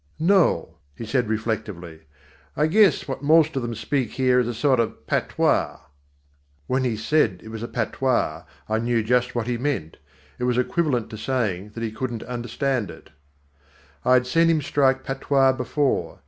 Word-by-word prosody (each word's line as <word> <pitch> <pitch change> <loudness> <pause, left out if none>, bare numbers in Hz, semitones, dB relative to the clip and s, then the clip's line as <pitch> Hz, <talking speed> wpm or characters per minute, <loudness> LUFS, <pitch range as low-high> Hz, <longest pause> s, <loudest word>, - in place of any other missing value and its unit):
"No," 160 - +2 0.2
he 115 - -7
said 120 0 0
reflectively, 105 -7 -4 0.6
"I 150 - +3
guess 185 -1 +3
what 135 -1 -4
most 155 +1 +4
of 135 - 0
them 120 -1 -4
speak 130 +1 -2
here 130 -1 +3
is 125 - +1
a 120 - -2
sort 130 +1 +2
of 110 -10 -2
patois." - - 0 0.9
When 130 - 0
he 120 -4 -1
said 110 -5 +1
it 110 - -10
was 110 -1 -7
a 115 - -4
patois, 125 +2 -1 0.2
I 110 +1 0
knew 115 -1 0
just 125 +2 +1
what 120 -2 -1
he 120 -1 -2
meant. 125 - -3 0.4
It 125 - -1
was 125 -1 +1
equivalent 125 -3 0
to 110 - -7
saying 105 -6 -2
that 115 - -5
he 110 - -2
couldn't 120 0 -4
understand 120 -2 -2
it. - - -13 0.9
I 125 - +4
had 125 -1 +4
seen 165 +6 +3
him 160 -3 +2
strike 135 -2 +2
patois 135 0 +2
before. 135 +2 -1
125 Hz, 175 wpm, -23 LUFS, 110-135 Hz, 0.9 s, most